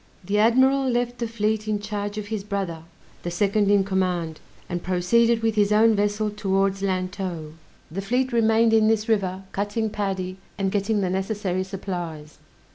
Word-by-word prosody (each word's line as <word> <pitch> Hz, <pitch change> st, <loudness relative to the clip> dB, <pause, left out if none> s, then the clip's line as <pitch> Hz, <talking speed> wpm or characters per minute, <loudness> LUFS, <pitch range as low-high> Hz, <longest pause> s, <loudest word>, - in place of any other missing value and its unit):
The 200 Hz, +3 st, 0 dB
admiral 260 Hz, +4 st, +4 dB
left 245 Hz, 0 st, -1 dB
the 235 Hz, -, -1 dB
fleet 215 Hz, -1 st, -1 dB
in 215 Hz, -1 st, +1 dB
charge 205 Hz, 0 st, -4 dB
of 210 Hz, -1 st, -5 dB
his 215 Hz, -3 st, -3 dB
brother, 190 Hz, -6 st, -4 dB, 0.4 s
the 175 Hz, -, -3 dB
second 200 Hz, +3 st, +1 dB
in 205 Hz, -1 st, +4 dB
command, 180 Hz, -4 st, -1 dB, 0.3 s
and 175 Hz, -1 st, -3 dB
proceeded 225 Hz, +6 st, +2 dB
with 225 Hz, -1 st, +2 dB
his 210 Hz, -1 st, +2 dB
own 220 Hz, +1 st, +5 dB
vessel 205 Hz, +1 st, 0 dB
towards 195 Hz, -1 st, 0 dB
Lantow. 185 Hz, -4 st, -3 dB, 0.4 s
The 195 Hz, +4 st, -3 dB
fleet 250 Hz, +5 st, 0 dB
remained 225 Hz, 0 st, +4 dB
in 220 Hz, -1 st, +5 dB
this 220 Hz, 0 st, +1 dB
river, 195 Hz, -4 st, 0 dB
cutting 205 Hz, +2 st, -2 dB
paddy, 190 Hz, -3 st, -3 dB, 0.2 s
and 195 Hz, -1 st, 0 dB
getting 205 Hz, +1 st, 0 dB
the 185 Hz, -2 st, 0 dB
necessary 190 Hz, -1 st, -1 dB
supplies. 175 Hz, -5 st, -6 dB
205 Hz, 165 wpm, -24 LUFS, 190-220 Hz, 0.4 s, own